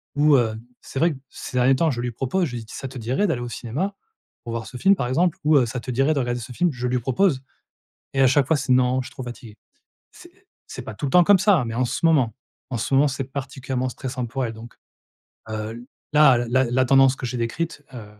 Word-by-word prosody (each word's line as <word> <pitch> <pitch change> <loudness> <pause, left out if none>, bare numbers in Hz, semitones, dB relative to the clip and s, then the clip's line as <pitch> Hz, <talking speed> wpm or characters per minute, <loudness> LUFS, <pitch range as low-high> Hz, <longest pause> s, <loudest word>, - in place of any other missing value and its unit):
ou, 145 0 +5
heu, 110 -3 +1 0.3
c'est 135 - -6
vrai 165 +1 +3
que 135 - -10
ces 125 - -7
derniers 125 +2 +4
temps 160 +2 +2
je 120 - -3
lui 120 0 -2
propose, 135 +10 -1
je 125 -6 -5
lui 115 - -5
dis: 110 - -13
«Ça 135 - -5
te 130 0 -9
dirait 130 - 0
d'aller 140 -9 -1
au 120 - -5
cinéma 150 - -4 0.5
pour 120 - -6
voir 115 -1 -4
ce - - -12
film 195 +10 +4
par 125 - -2
exemple?» 165 +7 +1
ou, 150 0 +5
heu: 130 - +4
«Ça 120 +2 -4
te 125 - -6
dirait 135 +5 +2
de 145 - -1
regarder 120 -1 -1
ce 120 - -9
film?» 175 +6 +1
je 125 0 -3
lui 125 0 0
propose 135 - +1 0.7
et 135 - +1
à 135 - +6
chaque 140 0 +3
fois 160 - +3
c'est: 135 - -2
«Non, 130 0 +2
je 130 - -8
suis - - -13
trop 130 - -7
fatiguée.» 120 -3 -10 0.5
C'est 370 +2 -18 0.2
c'est - - -7
pas - - -7
tout 145 - -4
le 130 - -4
temps 180 -1 +6
comme 200 +1 +5
ça, 205 0 +4
hein, 125 - -2
mais 115 - -4
en 125 +1 +1
ce 165 - -2
moment, 135 -9 +3 0.4
en 130 - -3
ce 115 - -3
moment 140 +2 +5
c'est 135 0 -4
particulièrement 135 -1 -4
stressant 125 0 -5
pour 130 +2 -2
elle 115 - -4
donc, 115 +2 -12 0.8
heu, 110 +2 -5 0.3
là, 150 -5 +6
la 130 +2 +3
la 125 +2 +1
tendance 135 +1 +5
que 125 - -5
j'ai 125 +1 -4
décrite, 145 +7 -3
heu, 115 -4 -8
130 Hz, 260 wpm, -23 LUFS, 120-145 Hz, 0.8 s, à